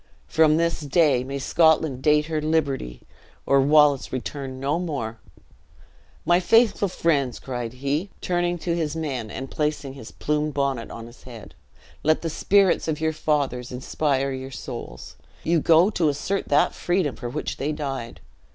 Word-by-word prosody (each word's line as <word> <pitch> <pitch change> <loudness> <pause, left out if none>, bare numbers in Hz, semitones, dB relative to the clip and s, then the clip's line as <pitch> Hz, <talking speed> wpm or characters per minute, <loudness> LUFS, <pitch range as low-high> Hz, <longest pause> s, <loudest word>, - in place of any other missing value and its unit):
"From 155 -1 +4
this 170 0 0
day 145 -3 +2
may 135 +2 -5
Scotland 160 -2 +2
date 150 +1 +3
her 155 -1 -2
liberty, 140 - -1 0.4
or 140 0 +4
Wallace 145 -1 +4
return 130 +1 -5
no 140 +5 0
more! 135 -10 -4 1.1
My 175 0 +4
faithful 220 +2 +3
friends," 145 -8 0
cried 120 -3 -5
he, 140 +8 -2
turning 175 0 0
to 170 0 -2
his 160 -2 -2
men, 135 -9 -3
and 135 +5 -7
placing 150 -3 -2
his 135 -5 -10
plumed 150 0 -2
bonnet 140 -4 -1
on 115 - -8
his 120 +1 -15
head, 115 -4 -11 0.5
"let 155 +2 +2
the 165 - -2
spirits 195 +1 +3
of 155 -2 -1
your 160 0 0
fathers 140 -5 -1
inspire 135 +1 -1
you 130 0 -5
souls; 65 - -8 0.3
ye 165 +1 +2
go 165 +6 +5
to 170 -7 +1
assert 185 +7 -2
that 145 - +3
freedom 175 -6 0
for 120 - -6
which - - -4
they 145 +3 -1
died. 135 -6 -5
150 Hz, 160 wpm, -24 LUFS, 130-160 Hz, 1.1 s, go